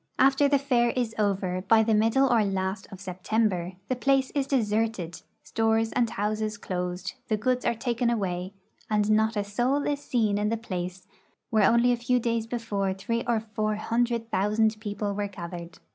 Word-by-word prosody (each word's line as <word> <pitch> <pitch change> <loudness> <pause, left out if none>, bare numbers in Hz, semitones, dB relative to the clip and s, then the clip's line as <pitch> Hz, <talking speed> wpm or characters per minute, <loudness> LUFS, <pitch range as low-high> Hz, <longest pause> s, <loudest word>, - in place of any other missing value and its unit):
After 270 +2 +4
the 280 0 +4
fair 250 -4 +2
is 240 -2 -1
over, 190 -3 0
by 220 0 +6
the 220 0 +1
middle 225 +5 +4
or 235 -4 +3
last 190 0 -2
of 195 - -9
September, 185 -1 -1
the 255 - 0
place 270 +1 +2
is 275 -2 -1
deserted, 215 - -1 0.2
stores 225 0 +1
and 240 -2 +1
houses 215 +1 -2
closed, 180 -1 -4
the 215 - +1
goods 250 +3 0
are - - +2
taken 235 0 0
away, 185 -5 -2 0.4
and 210 0 +2
not 220 +1 +2
a 205 - +1
soul 245 +8 0
is 290 -1 -1
seen 215 -4 +1
in 210 0 +1
the 230 - 0
place 185 -4 -5 0.5
where 215 -3 +5
only 235 +1 +4
a 245 - +1
few 245 +1 +1
days 230 -1 -1
before 205 -5 -2
three 230 +5 -2
or 235 -2 +2
four 215 -1 -2
hundred 230 +1 -1
thousand 215 +3 +2
people 205 -1 -3
were 205 0 -2
gathered. 170 -2 -8
220 Hz, 180 wpm, -27 LUFS, 200-235 Hz, 0.5 s, by